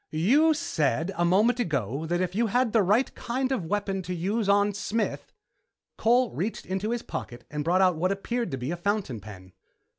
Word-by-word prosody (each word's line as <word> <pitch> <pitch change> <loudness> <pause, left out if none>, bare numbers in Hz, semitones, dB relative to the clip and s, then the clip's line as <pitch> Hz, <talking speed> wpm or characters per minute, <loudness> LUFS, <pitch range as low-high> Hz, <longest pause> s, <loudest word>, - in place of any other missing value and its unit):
"You 275 - +3
said 155 - 0
a 175 - 0
moment 210 +8 +3
ago 140 - -1
that 175 +2 0
if 180 -1 -1
you'd 230 +3 +1
had 245 +1 +1
the 225 - +5
right 210 +7 +2
kind 255 +2 -2
of 195 -11 -1
weapon 200 0 -1
to 180 0 -4
use 200 +5 -1
on 205 +1 +3
Smith 215 +2 -3 0.3
" - - -59
Cole 245 +2 +3
reached 210 +6 -3
into 190 +3 -2
his 235 0 -2
pocket 120 0 -7
and 150 0 -3
brought 175 +4 +2
out 180 -3 +3
what 185 +4 +1
appeared 235 +4 -2
to 135 - -3
be 130 +4 -4
a 175 - -3
fountain 190 - -1
pen. 95 -3 -12
195 Hz, 205 wpm, -27 LUFS, 160-225 Hz, 0.3 s, the